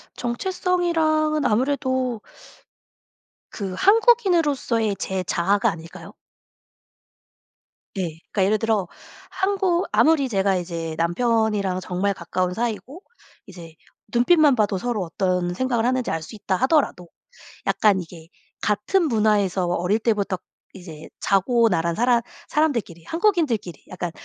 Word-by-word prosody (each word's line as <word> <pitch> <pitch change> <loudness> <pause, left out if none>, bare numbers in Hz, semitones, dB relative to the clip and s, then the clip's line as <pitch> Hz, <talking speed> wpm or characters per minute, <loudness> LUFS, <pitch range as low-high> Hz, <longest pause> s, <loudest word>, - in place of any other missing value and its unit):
정체성이랑은 310 +1 0
아무래도 260 -1 0 1.3
그 195 -3 -5
한국인으로서의 340 - +3
제 190 -1 -2
자아가 195 +4 +1
아닐까요? 165 0 -10 1.9
예. 190 - 0 0.3
그러니까 190 -3 +1
예를 215 +2 +2
들어 215 -5 0 0.4
한국 380 -2 0
아무리 305 -4 +3
제가 195 -3 +1
이제 165 -2 -4
남편이랑 205 +1 0
정말 185 +2 -1
가까운 180 +1 -2
사이고 240 - -4 0.4
이제 170 -5 -12 0.4
눈빛만 290 +3 +4
봐도 205 -4 +1
서로 235 -4 -2
어떤 180 0 -1
생각을 240 +2 0
하는지 255 -1 0
알 165 - -2
수 220 - -10
있다하더라도 205 - 0 0.6
약간 205 -3 +3
이게 165 -1 -12 0.3
같은 310 - +1
문화에서 210 -5 +1
어릴 180 +4 +1
때부터 210 -4 0 0.4
이제 165 -5 -11
자고 230 +4 +3
나란 170 -3 0
사람 240 0 +3 0.3
사람들끼리 235 - -1
한국인들끼리 320 - 0
약간 180 -2 -5
215 Hz, 290 characters per minute, -23 LUFS, 185-275 Hz, 1.9 s, 눈빛만